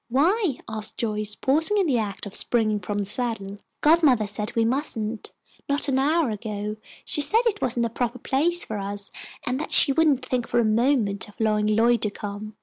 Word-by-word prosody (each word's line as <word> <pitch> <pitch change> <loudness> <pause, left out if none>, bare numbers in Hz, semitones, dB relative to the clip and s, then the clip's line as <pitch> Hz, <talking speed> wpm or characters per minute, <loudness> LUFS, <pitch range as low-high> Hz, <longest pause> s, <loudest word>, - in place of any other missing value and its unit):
"Why?" 325 - +2
asked 220 0 -5
Joyce, 210 -2 -3
pausing 320 - +2
in 395 - +2
the 265 -7 +1
act 205 -2 -4
of 200 - -8
springing 215 -3 +1
from 205 +2 -4
the 205 - -1
saddle. 205 -2 -2 0.2
"Godmother 295 -8 +4
said 210 +2 -4
we 230 -1 +2
mustn't. 230 -4 -2 0.4
Not 285 +1 +1
an 265 -1 +1
hour 300 -1 +2
ago, 210 0 -5 0.3
she 295 - +2
said 440 +10 +4
it 420 -3 0
wasn't 240 -1 0
a - - -2
proper 240 +2 -3
place 335 +8 +1
for 215 -2 -5
us, 200 0 -4 0.3
and 250 +2 -2
that 310 - -5
she 285 - +7
wouldn't 285 -3 +2
think 245 -3 -2
for 240 - +1
a 235 - +2
moment 215 -3 +1
of 210 - -18
allowing 215 -1 +1
Lloyd 230 +2 +3
to 210 - +1
come. 205 +1 -7
230 Hz, 200 wpm, -24 LUFS, 210-275 Hz, 0.4 s, she